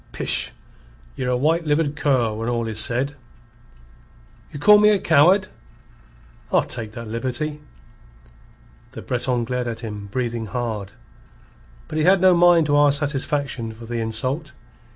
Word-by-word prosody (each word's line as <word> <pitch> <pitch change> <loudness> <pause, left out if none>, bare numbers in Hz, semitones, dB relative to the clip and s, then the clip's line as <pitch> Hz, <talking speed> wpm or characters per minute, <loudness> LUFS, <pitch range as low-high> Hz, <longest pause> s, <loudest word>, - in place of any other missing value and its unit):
"Pish! - - +3 0.6
Ye're 125 - -3
a 125 - +1
white 160 +6 +1
livered 150 0 0
cur 130 -7 +1
when 115 +2 -4
all 120 -1 -1
is 110 -1 -4
said." 130 +5 0 1.4
"You - - -8
call 210 +8 +6
me 210 0 +5
a 210 - +3
coward?" 180 +4 +3 1.0
"I'll - - +3
take 110 -3 -5
that 115 -1 -8
liberty." 130 +7 -4 1.3
The - - -9
Breton 125 -1 -1
glared 125 0 -3
at 115 -1 -5
him, 105 -3 -7
breathing 115 +1 -3
hard. 110 -4 -4 0.9
But 155 - -4
he - - +1
had 190 +3 +4
no 185 0 +5
mind 175 -2 +5
to 145 -1 +2
ask 145 -1 +4
satisfaction 140 -5 -3
for 115 +1 -12
the 120 0 -4
insult. 130 +6 -3
130 Hz, 150 wpm, -21 LUFS, 115-150 Hz, 1.4 s, call